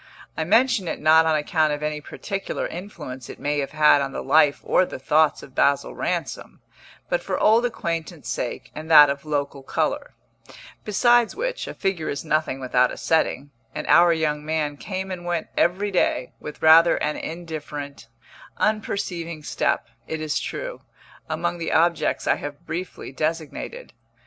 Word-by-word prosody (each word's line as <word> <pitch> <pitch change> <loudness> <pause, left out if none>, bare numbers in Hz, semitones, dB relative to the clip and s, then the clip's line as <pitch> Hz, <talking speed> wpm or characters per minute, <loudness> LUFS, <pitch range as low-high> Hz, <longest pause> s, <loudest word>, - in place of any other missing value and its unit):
I 160 - -2
mention 225 0 +3
it - - -3
not 160 +1 +5
on 160 - +3
account 155 0 +1
of 145 0 -5
any 150 0 -2
particular 195 +6 -4
influence 155 - -8
it - - -9
may 145 0 -1
have 140 - -2
had 150 -2 +5
on 135 0 -3
the - - -4
life 150 -2 +4
or - - +3
the - - -5
thoughts 150 +3 +2
of 135 - -13
Basil 140 +1 +2
Ransom, - - -4 0.5
but - - 0
for - - -3
old 230 +3 +4
acquaintance 165 - -5
sake 120 - -4
and 155 +1 -8
that 150 -3 +9
of 140 +1 -6
local 145 -2 -2
colour; 135 - -2 0.7
besides 240 +2 +3
which, - - -3
a - - -7
figure 190 -5 -2
is 140 +3 -4
nothing 155 -3 0
without 125 -1 +2
a - - -7
setting, 150 -3 0 0.2
and - - -4
our 170 0 +6
young 150 -2 0
man 155 -1 -1
came 190 +4 -5
and 180 -1 -5
went 175 -2 -2
every 200 +4 +1
day, 155 -8 0
with 150 - -9
rather 165 +2 +7
an 150 - -1
indifferent, 150 -6 -7 0.5
unperceiving 175 -6 -2
step, - - -1 0.2
it 160 - -4
is 155 -1 -1
true, - - -5 0.5
among 175 - -2
the 165 - -3
objects 170 +1 +2
I - - +2
have 145 0 -8
briefly 170 -1 -6
designated. 160 - -4
160 Hz, 165 wpm, -23 LUFS, 150-180 Hz, 0.7 s, that